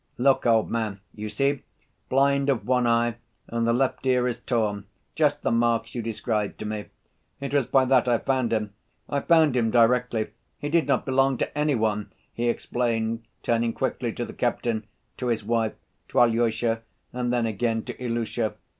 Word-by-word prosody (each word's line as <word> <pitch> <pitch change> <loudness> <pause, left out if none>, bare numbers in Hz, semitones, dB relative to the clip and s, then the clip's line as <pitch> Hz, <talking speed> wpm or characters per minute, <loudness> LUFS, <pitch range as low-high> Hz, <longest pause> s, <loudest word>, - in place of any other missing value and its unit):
"Look, 130 0 +3
old 115 -2 +3
man, 110 -4 -2
you 105 0 -5
see, 140 +4 0 0.5
blind 140 +1 +3
of 130 -5 0
one 125 -1 +2
eye 115 0 +2 0.3
and 115 0 -1
the - - +4
left 130 +2 0
ear 125 -1 +3
is 120 -2 -3
torn, 105 -5 -1 0.3
just 150 -2 +1
the - - +1
marks 115 -1 +1
you 120 - -2
described 110 -2 -2
to - - -6
me. 105 -1 -4 0.5
It 140 0 -5
was 140 -4 +2
by 135 -1 +4
that 130 -1 +3
I 120 -1 +4
found 130 -1 0
him. 105 -2 -1 0.3
I 140 - 0
found 160 -3 +4
him 115 -2 +2
directly. 120 -1 +3 0.3
He 145 - -4
did 165 0 +2
not 140 -3 +1
belong 135 0 +2
to - - -3
any 150 -1 +2
one!" 105 -2 -1 0.2
he 120 0 0
explained, 115 -1 -1 0.2
turning 115 0 +1
quickly - - -2
to - - -3
the - - -9
captain, 110 -3 -1 0.3
to 125 - -3
his 115 -3 0
wife, 115 -1 +1 0.4
to - - +1
Alyosha 115 -1 +2 0.3
and 125 -1 -1
then 120 -1 +1
again 115 +1 -1
to - - -6
Ilusha. 115 -2 -1
120 Hz, 180 wpm, -25 LUFS, 115-130 Hz, 0.5 s, the